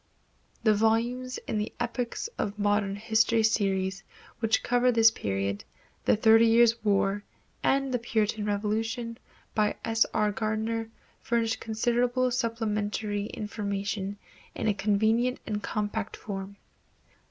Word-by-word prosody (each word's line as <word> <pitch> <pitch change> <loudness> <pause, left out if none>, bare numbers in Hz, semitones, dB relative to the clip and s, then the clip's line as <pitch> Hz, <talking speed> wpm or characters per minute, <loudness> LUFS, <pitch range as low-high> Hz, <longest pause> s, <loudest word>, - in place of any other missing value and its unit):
The 215 - +5
volumes 235 +4 +1
in 215 - -1
the 210 - -3
"Epochs 245 - -2
of 205 0 -2
Modern 205 -1 +1
History 225 +1 +2
Series," 195 -3 +1 0.4
which 225 -2 +1
cover 245 +1 +3
this 225 -1 +6
period, 100 - -2 0.4
The - - +5
Thirty 225 +1 +6
Years' 230 0 +4
War 205 -1 +1 0.4
and 270 -1 +1
the 245 - +1
Puritan 220 -2 0
Revolution, 225 +3 -2 0.3
by 210 -1 +1
S. 225 0 +3
R. 210 -1 +1
Gardiner, 220 +2 -2 0.3
furnish 230 -1 0
considerable 245 +3 0
supplementary 215 -3 -1
information 200 -2 -3 0.4
in - - -2
a 210 - +3
convenient 220 +5 +1
and 210 -1 -3
compact 210 0 -3
form. 195 -1 -6
220 Hz, 120 wpm, -28 LUFS, 205-230 Hz, 0.4 s, this